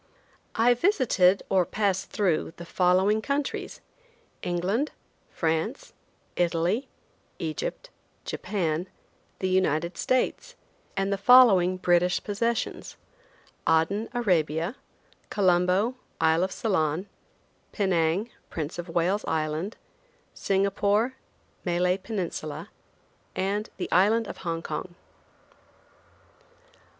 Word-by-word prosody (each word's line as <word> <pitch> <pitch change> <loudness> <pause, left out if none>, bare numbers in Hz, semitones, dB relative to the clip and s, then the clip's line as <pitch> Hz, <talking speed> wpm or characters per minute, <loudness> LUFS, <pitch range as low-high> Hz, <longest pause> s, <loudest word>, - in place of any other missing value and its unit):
I 235 +2 +5
visited 240 - +3
or 190 -2 +3
passed 195 0 -1
through 175 -5 0
the 170 - -8
following 185 +5 +3
countries: 280 +3 -3 0.6
England, 190 - 0 0.4
France, 165 - -2 0.4
Italy, 175 +8 +1 0.5
Egypt, - - -4 0.3
Japan, 175 -3 -2 0.5
the 190 - -1
United 175 -2 +1
States, - - 0 0.4
and 195 +1 +1
the 195 - -2
following 195 -6 +6
British 180 0 +2
possessions: 230 +3 -2 0.7
Aden, 165 +7 +2
Arabia; 175 - 0 0.5
Colombo, 185 +4 +2 0.3
Isle 160 +2 +3
of 190 - -6
Ceylon; 180 -4 0 0.6
Penang, 190 +2 +1 0.2
Prince 160 +1 -4
of 175 0 -6
Wales 175 +5 +1
Island; 160 +5 -2 0.6
Singapore, 200 +4 +1 0.5
Malay 180 +1 +1
Peninsula; 185 -7 -5 0.6
and 200 +3 -1
the - - -4
Island 220 +5 +4
of - - -7
Hong 165 -2 -3
Kong. 175 -1 -5
190 Hz, 90 wpm, -27 LUFS, 170-215 Hz, 0.7 s, following